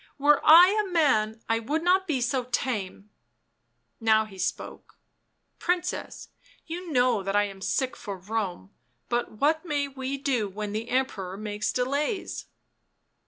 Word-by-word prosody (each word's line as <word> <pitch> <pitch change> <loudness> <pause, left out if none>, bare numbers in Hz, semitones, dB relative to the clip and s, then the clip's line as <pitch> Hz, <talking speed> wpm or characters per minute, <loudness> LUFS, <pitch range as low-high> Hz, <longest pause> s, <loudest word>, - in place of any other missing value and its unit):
" - - -36
Were 290 +1 +4
I 340 +4 +9
a 390 - -7
man 225 -10 +2
I 225 0 +1
would 295 +8 -2
not 375 +2 +3
be 280 -6 0
so 250 +1 0
tame." 210 -5 -3 0.9
How 220 -1 +4
he 195 -3 -13
spoke. 185 - -5 0.3
" - - -49
Princess, 360 +1 -2 0.4
you 340 +1 -6
know 250 -5 +3
that 195 +1 -2
I 205 - +4
am 195 -1 -7
sick 260 +7 -1
for 200 -3 -7
Rome, 190 - -4 0.4
but 240 -1 -1
what 305 +9 +1
may 290 -4 -1
we 270 0 -4
do 260 -7 -1
when 205 +1 -5
the 220 +3 -4
Emperor 200 -8 -1
makes 210 0 -2
delays 285 - -2
250 Hz, 155 wpm, -27 LUFS, 210-295 Hz, 0.9 s, I